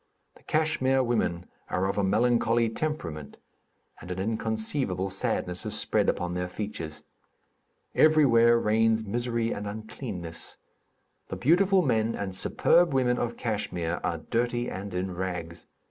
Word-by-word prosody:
The - - -19
Kachmyr 150 -4 +1
women 90 -7 0 0.2
are 95 - 0
of 100 +1 -1
a - - +2
melancholy 115 +3 +2
temperament, 90 - -4 0.6
and 90 - -11
an 90 - -4
inconceivable 110 -1 -2
sadness 90 -2 -2
is - - -1
spread - - +2
upon 90 0 -1
their 90 0 -2
features. 90 -5 -6 0.9
Everywhere 120 -7 +5
reigns 110 0 +2
misery 115 +2 -1
and 105 0 -4
uncleanness. 100 -5 -6 0.7
The - - -5
beautiful 185 +6 +4
men 115 -4 +1
and 100 -2 -4
superb 170 - +3
women 125 -2 +2
of 120 -1 -2
Kachmyr 90 -7 -2
are - - -1
dirty 120 +1 -1
and 100 +2 -6
in 90 +1 -2
rags. 90 -2 -5
110 Hz, 130 wpm, -27 LUFS, 95-120 Hz, 0.9 s, Everywhere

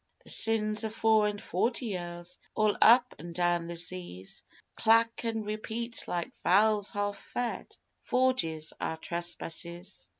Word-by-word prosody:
The - - 0
sins 215 -1 +2
o' 220 - -1
four 220 -1 +3
and 205 0 -3
forty 230 +8 -1
years, 175 -3 -6 0.2
all 215 -1 +3
up 245 +2 +7
an' 170 +2 -8
down 175 -1 +1
the 170 - -5
seas, 170 - -5 0.3
Clack 230 +1 +3
an' 225 -1 -1
repeat 220 +2 -5
like 175 -1 -2
valves 205 +2 +4
half 205 0 -2
fed.... 245 -1 -4 0.2
Forgie's 170 -12 0
our 160 - -2
trespasses. 175 +2 -5
205 Hz, 135 wpm, -30 LUFS, 175-225 Hz, 0.3 s, up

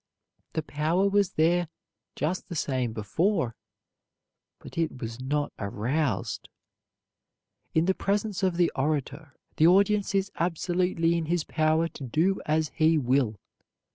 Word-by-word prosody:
The 160 - -1
power 160 +6 +1
was 200 -2 +2
there 170 +2 +2 0.5
just 180 +5 -2
the 175 - -5
same 130 -5 -1
before, 120 - 0 1.0
but - - -12
it 165 -6 -1
was 115 +1 -6
not 145 +3 -1
aroused. 110 +3 -2 1.3
In 160 +1 +4
the 190 - +3
presence 200 +1 -1
of 185 -3 +1
the 175 -1 +3
orator, 145 +1 -2 0.2
the 160 - +6
audience 200 +2 +3
is 195 0 +1
absolutely 175 0 +1
in 165 -1 -1
his 170 -1 +1
power 155 +1 +1
to 145 - -10
do 160 +10 +1
as 155 0 +1
he 160 +1 +3
will. 125 -6 +1
160 Hz, 135 wpm, -27 LUFS, 140-180 Hz, 1.3 s, the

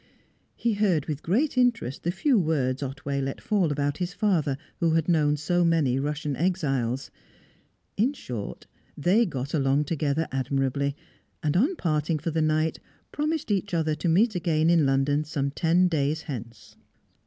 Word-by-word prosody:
He 235 -1 0
heard 190 -8 +1
with 150 -2 -4
great 255 - +1
interest 235 - +1
the 170 - -2
few 235 - +2
words 140 -6 0
Otway 140 0 -3
let 135 0 -3
fall 195 -7 +1
about 145 +1 -1
his 180 0 -2
father, 175 - +1 0.2
who 165 -2 +2
had 165 -1 +1
known 150 -4 +3
so 175 +4 +1
many 155 -6 +2
Russian 145 0 -2
exiles. 135 -8 -1 0.9
In 240 +8 +2
short, 120 - -7 0.3
they 200 +9 +3
got 135 -3 -5
along 140 -1 +2
together 150 0 -1
admirably, 135 +1 -1 0.5
and, 150 +1 0
on 275 - +3
parting 155 - 0
for 160 +3 -3
the 160 +1 0
night, 155 +1 +1 0.3
promised 305 -4 -2
each 200 -2 0
other 160 -2 +1
to 170 +3 -1
meet 210 +7 +3
again 165 -2 +2
in 165 -5 +4
London 135 +2 +2
some 140 -2 -2
ten 170 +5 +3
days 155 -1 0
hence. 120 -5 -8
155 Hz, 160 wpm, -26 LUFS, 140-180 Hz, 0.9 s, in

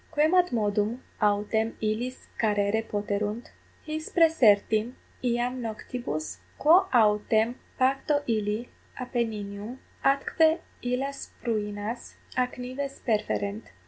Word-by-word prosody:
Quemadmodum 245 - +2 0.2
autem 210 +2 +1
illis 225 +4 -2
carere 210 0 +2
poterunt, 210 +1 -3 0.3
his 310 0 -4
praesertim 235 - +4 0.3
iam 245 +1 0
noctibus? 220 -8 -4 0.2
quo 355 +6 +6
autem 220 0 +3 0.2
pacto 270 +3 +2
illi 215 +1 -1 0.3
Appenninum 225 -2 -3 0.3
atque 315 +4 +3 0.2
illas 265 +3 -2
pruinas 215 0 -3 0.2
ac 250 -1 0
nives 270 +2 -5
perferent? 215 -2 -1
230 Hz, 85 wpm, -27 LUFS, 210-260 Hz, 0.3 s, quo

